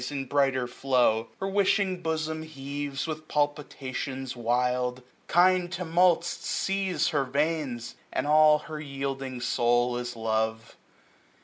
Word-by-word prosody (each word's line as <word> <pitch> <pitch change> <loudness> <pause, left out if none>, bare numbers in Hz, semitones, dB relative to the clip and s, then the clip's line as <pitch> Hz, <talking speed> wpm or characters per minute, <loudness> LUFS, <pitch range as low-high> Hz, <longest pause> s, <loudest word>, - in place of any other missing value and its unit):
In 140 -2 -3
brighter 135 -1 +1
flow 125 -3 +1
j - - -25
her 195 - -1
wishing 195 -1 +1
bosom 160 -1 -2
heaves, 140 -2 -5
965 155 -1 -2
With 155 - -24
palpitations 135 -3 -2
wild; 125 +1 0 0.2
kind 180 0 +4
tumults 175 -1 +3
seize 195 0 -1
Her 145 -4 +1
veins, 140 -3 -1 0.2
and - - -1
all 150 0 +6
her 155 0 -7
yielding 135 -2 -4
soul 120 0 +2
is 120 0 -4
love. 110 0 -2
140 Hz, 125 wpm, -27 LUFS, 125-160 Hz, 0.2 s, all